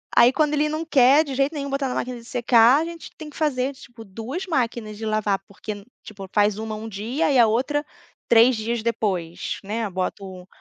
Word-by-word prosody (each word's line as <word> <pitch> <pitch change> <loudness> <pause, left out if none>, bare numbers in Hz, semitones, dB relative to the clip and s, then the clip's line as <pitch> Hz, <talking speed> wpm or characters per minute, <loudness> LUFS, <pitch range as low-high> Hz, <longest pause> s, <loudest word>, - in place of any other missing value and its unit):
Aí 245 +2 +6
quando 300 -1 +1
ele 300 +1 +2
não 310 +2 -3
quer 280 0 +5
de 280 -3 -6
jeito 275 +3 +1
nenhum 280 -2 -4
botar 275 0 -1
na 250 - -3
máquina 250 -1 -3
de 235 - -13
secar 245 +2 +4
a - - -2
gente 335 -1 -9
tem 310 -2 -9
que - - -16
fazer, 280 -3 0
tipo, 240 -4 -13
2 230 - -6
máquinas 235 - -2
de 220 - -6
lavar, 215 -2 0
porque 205 0 -8 0.2
tipo 195 -3 -10
faz 205 -1 +2
uma 220 0 -4
um 220 +1 -7
dia 230 +9 -1
e 265 - +4
a 235 - +7
outra 275 +7 0 0.4
3 235 +2 +6
dias 225 +1 -2
depois, 185 -7 -2
né. 215 +2 -3
Boto 185 0 -5
235 Hz, 210 wpm, -23 LUFS, 215-280 Hz, 0.4 s, a